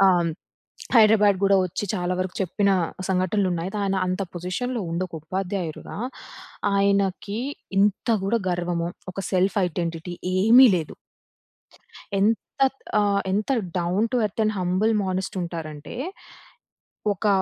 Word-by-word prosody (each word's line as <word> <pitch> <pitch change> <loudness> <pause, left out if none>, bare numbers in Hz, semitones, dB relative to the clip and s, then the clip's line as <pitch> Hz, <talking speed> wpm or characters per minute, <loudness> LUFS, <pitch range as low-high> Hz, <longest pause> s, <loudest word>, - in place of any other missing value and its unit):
ఆహ్, 175 -3 +3 0.7
హైదరాబాద్ 210 -3 +6
కూడా 195 0 +5
వచ్చి 185 +3 -4
చాలా 180 -2 -1
వరకు 185 0 -2
చెప్పిన 200 +2 +1 0.4
సంఘటనలు 190 +2 +1
ఉన్నాయి. 175 +3 -3
కాని 195 -1 0
అంత 185 +2 -1
పొజిషన్‌లో 210 +7 -3
ఉండొక 175 +1 -3
ఉపాధ్యాయుడిగా, 185 0 -4 0.8
ఆయనకి 200 +1 +1 0.4
ఇంత 205 +3 +2
కూడా 225 +4 +1
గర్వము, 175 -1 -1 0.2
ఒక 185 - -6
సెల్ఫ్ 190 +2 +2
ఐడెంటిటీ 170 0 -4 0.2
ఏమీ 235 +7 +8
లేదు. 160 -3 -5 1.3
ఎంత 215 +3 +3 0.6
ఆహ్, 200 -1 +2
ఎంత 210 +6 0 0.3
down 180 +6 +1
to - - +3
earth 210 +2 -2
and 215 0 +1
humble 185 +5 +1
మానేస్ట్ 190 0 -2
ఉంటారంటే, 160 -1 -6 1.2
ఒక 210 - -2
190 Hz, 115 wpm, -24 LUFS, 175-205 Hz, 1.3 s, ఏమీ